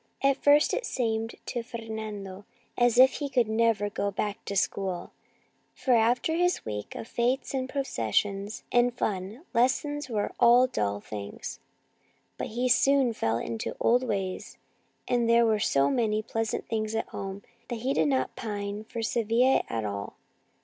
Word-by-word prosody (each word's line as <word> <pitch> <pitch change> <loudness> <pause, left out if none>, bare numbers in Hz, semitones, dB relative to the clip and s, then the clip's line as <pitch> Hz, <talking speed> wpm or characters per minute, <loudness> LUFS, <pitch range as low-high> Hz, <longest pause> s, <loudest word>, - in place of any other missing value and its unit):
At 275 0 +3
first 290 +1 +5
it - - -1
seemed 225 - -2
to 240 - -3
Fer 235 0 -7
nando 205 -3 -6 0.3
as 240 -1 +3
if 260 +1 +7
he 290 -2 -3
could 250 -4 +2
never 220 -1 +2
go 200 0 -2
back 205 +2 -3
to 200 - -4
school, 190 -2 -1 0.6
for 260 - +1
after 240 +6 +3
his 355 +2 +1
week 105 -1 -5
of 225 - -6
fetes 245 +5 0
and 260 -1 -2
processions 200 - -1
and 245 0 +3
fun, 205 - -3
lessons 270 +4 +1
were 210 -3 -1
dull 235 - +4
things, 100 -1 -7 0.8
but - - -2
he 245 +3 -1
soon 265 0 +4
fell 115 - 0
into 115 -1 -3
the - - -24
old 245 +2 +4
ways, 195 -6 -3 0.5
and 240 -2 +1
there 235 0 +5
were 220 -2 +2
so 140 -7 +2
many 215 -2 +1
pleasant 225 0 -3
things 220 -1 -2
at 225 - -2
home 195 +1 -6 0.2
that 235 -2 -5
he 265 +3 0
did 160 - +2
not 130 -2 0
pine 205 -1 -4
for 230 +1 -5
Sevilla 235 +3 +3
at 110 -1 -2
all. 100 -1 -5
225 Hz, 165 wpm, -28 LUFS, 200-245 Hz, 0.8 s, if